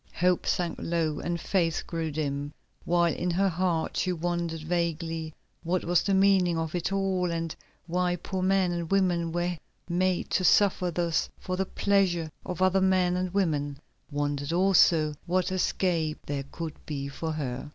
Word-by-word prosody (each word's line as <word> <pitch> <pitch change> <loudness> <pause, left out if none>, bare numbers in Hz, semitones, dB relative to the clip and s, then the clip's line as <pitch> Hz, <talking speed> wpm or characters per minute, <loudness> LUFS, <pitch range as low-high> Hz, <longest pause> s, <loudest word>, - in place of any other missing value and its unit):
Hope 180 0 +2
sank 175 -2 0
low 165 -3 -1
and 170 0 -2
faith 165 -2 0
grew 165 -1 -3
dim, 145 -1 -3 0.3
while 170 -1 +3
in 180 - -2
her 190 +3 +2
heart 175 -2 -1
she 185 - +1
wondered 170 -2 -2
vaguely 165 -1 -2 0.3
what 175 +2 -1
was 175 0 +3
the 195 -1 +1
meaning 190 -3 +4
of 160 -1 -2
it 175 +1 -1
all, 190 -2 0
and 165 -1 -3 0.3
why 180 +1 0
poor 185 +2 -4
men 190 -1 +2
and 170 -2 -3
women 180 -4 +2
were 175 +1 -1 0.3
made 180 +1 0
to 185 - +1
suffer 185 -1 +4
thus 170 -1 0
for 185 - -4
the 190 0 -1
pleasure 180 -5 +1
of 180 +1 -2
other 185 +1 +3
men 185 -1 +3
and 180 0 -1
women; 150 -7 0 0.3
wondered 145 0 -2
also 170 -4 +4
what 185 +1 +1
escape 175 -4 0
there 140 -1 -3
could 165 -3 -5
be 140 -2 -3
for 160 +3 -4
her. 135 -2 -4
175 Hz, 165 wpm, -28 LUFS, 160-185 Hz, 0.3 s, meaning